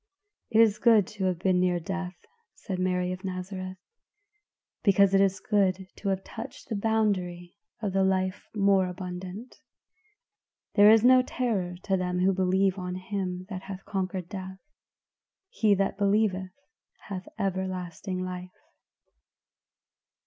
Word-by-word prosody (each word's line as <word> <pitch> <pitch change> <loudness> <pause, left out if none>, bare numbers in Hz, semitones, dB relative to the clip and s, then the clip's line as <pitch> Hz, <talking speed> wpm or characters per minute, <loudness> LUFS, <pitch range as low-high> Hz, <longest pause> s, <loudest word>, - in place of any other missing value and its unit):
"It 220 - +3
is 215 -2 +4
good 225 -5 +5
to 205 -3 -3
have 185 -2 +1
been 180 +1 +2
near 180 -1 +2
death," 185 +1 -4 0.4
said 190 -4 -5
Mary 180 0 0
of 185 +1 -6
Nazareth, 185 0 -5 1.0
"because 200 -1 +4
it 195 - +5
is 195 -1 +2
good 190 -2 +1
to 200 - -3
have 190 0 -1
touched 225 +2 -9
the 220 - -1
boundary 200 -5 0 0.3
of 200 -3 -1
the 195 0 +3
life 185 0 0
more 195 -2 +3
abundant. 180 +5 -7 1.2
There 205 0 +7
is 220 0 +6
no 255 0 +7
terror 220 -9 -2
to 195 -2 +1
them 180 0 0
that 195 - +4
believe 190 +1 +2
on 180 0 -4
him 185 -1 -4
that 185 -1 -4
hath 195 -1 -8
conquered 185 -2 -3
death; 190 -1 -7 0.9
'he 215 - +3
that 195 +1 -1
believeth 200 -2 +2 0.6
hath 190 -2 -5
everlasting 185 -1 -3
life. 180 0 -7
190 Hz, 135 wpm, -28 LUFS, 185-200 Hz, 1.2 s, There